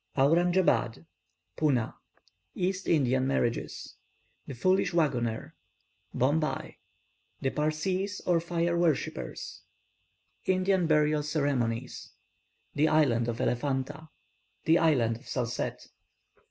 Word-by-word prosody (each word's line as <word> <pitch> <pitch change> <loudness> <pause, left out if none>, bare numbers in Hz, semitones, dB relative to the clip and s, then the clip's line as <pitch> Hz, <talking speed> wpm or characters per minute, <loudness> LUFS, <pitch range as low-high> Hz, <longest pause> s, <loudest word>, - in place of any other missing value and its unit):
AURANJABAD 165 -4 +2 0.5
PUNA 135 -8 +1 0.6
EAST 190 +1 -2
INDIAN 130 -4 +2
MARRIAGES 120 -3 -2 0.5
THE 135 - -6
FOOLISH 185 +7 +1
WAGGONER 120 -9 0 0.6
BOMBAY 150 +5 0 0.6
THE 135 - 0
PARSEES, 185 +7 -1
OR 175 -2 +3
FIRE 170 0 -1
WORSHIPPERS 160 - -2 0.8
INDIAN 185 -1 +2
BURIAL 150 -1 +3
CEREMONIES 140 -6 -2 0.6
THE 150 +2 +3
ISLAND 130 -7 +3
OF 120 -1 -3
ELEPHANTA 140 +4 -2 0.6
THE 165 +2 +5
ISLAND 125 -9 +2
OF - - -18
SALSETTE. 120 -2 -3
150 Hz, 90 wpm, -29 LUFS, 130-170 Hz, 0.8 s, THE